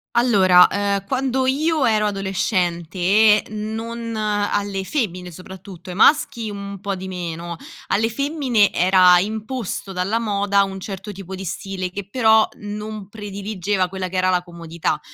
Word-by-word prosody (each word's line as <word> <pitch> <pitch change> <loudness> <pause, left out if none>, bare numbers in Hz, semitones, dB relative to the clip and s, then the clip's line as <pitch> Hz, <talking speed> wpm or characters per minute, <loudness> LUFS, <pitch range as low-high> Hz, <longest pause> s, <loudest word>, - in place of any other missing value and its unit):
Allora, 190 -7 +6
ehm, 200 -1 -1
quando 260 0 0
io 305 +2 +1
ero 215 -2 +2
adolescente, 190 +1 +2
non 225 +2 -5
alle 205 -2 -1
femmine 185 - -3
soprattutto, 185 0 -11
ai 180 - -6
maschi 230 -4 +3
mhmm 200 0 -7
un 195 - -9
po' 200 -1 -3
di 190 +1 -7
meno, 170 -2 -5 0.3
alle 225 +2 +1
femmine 265 -5 +1
era 180 0 +6
imposto 215 0 -4
dalla 190 +5 -1
moda 200 -2 +1
un 190 0 -6
certo 195 +2 -7
tipo 190 -1 -9
di 190 0 -6
stile 185 +1 -4
che 195 0 -6
però 220 -2 +4
non 210 -1 -7
prediligeva 200 -2 -3
quella 185 0 -4
che 185 - -5
era 185 - +2
la 180 -1 +2
comodità, 170 -2 -4
200 Hz, 145 wpm, -21 LUFS, 185-220 Hz, 0.3 s, Allora